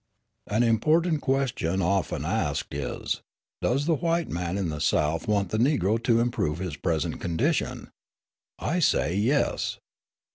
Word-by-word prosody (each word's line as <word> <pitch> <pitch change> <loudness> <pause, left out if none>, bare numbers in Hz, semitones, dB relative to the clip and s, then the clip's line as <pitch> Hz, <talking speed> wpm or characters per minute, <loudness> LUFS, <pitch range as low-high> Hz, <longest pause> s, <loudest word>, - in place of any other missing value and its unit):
An 110 +4 +2
important 155 +8 +2
question 130 -10 0
often 95 +1 0
asked - - -1
is, 70 0 -3 0.4
Does 135 +4 +1
the 165 - +3
white 165 +1 0
man 85 +2 -2
in 95 -4 -1
the 75 -2 -4
South 75 +3 +1
want 100 -3 +1
the 110 - -1
Negro 115 - +2
to 115 -2 +4
improve 115 -11 0
his 90 -4 -4
present 80 -1 -2
condition? 85 -2 -1 0.7
I 175 +4 -1
say, 150 - +2
"Yes." 120 +9 +1
105 Hz, 140 wpm, -26 LUFS, 85-135 Hz, 0.7 s, to